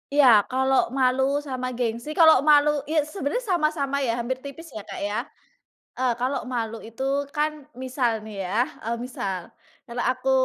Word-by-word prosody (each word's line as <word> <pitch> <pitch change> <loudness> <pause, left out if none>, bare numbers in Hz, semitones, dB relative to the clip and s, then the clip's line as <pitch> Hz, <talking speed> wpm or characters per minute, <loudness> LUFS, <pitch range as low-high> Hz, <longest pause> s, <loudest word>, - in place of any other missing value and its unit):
Iya 255 -8 +6
kalau 265 -1 +2
malu 265 +1 +2
sama 255 -3 -4
gengsi, 235 +2 -3
kalau 320 -4 +6
malu 295 -1 +4
iya 305 +1 -1
sebenarnya 400 - -2
sama-sama 290 -5 +1
ya 235 -2 0
hampir 255 +2 -3
tipis 305 +4 -9
ya 215 - -6
Kak, - - -8
ya. 215 +3 -2 0.7
E 255 - -5 0.2
kalau 255 +3 -1
malu 225 -1 -3
itu 230 +3 -8 0.3
kan, 300 0 -1 0.2
misal 255 -1 0 0.2
nih 205 -3 -5
ya 185 +3 -3 0.3
e 220 - -5
misal, 195 -7 -5 0.3
kalau 240 0 -4
aku 255 +1 0
260 Hz, 160 wpm, -25 LUFS, 235-290 Hz, 0.7 s, Iya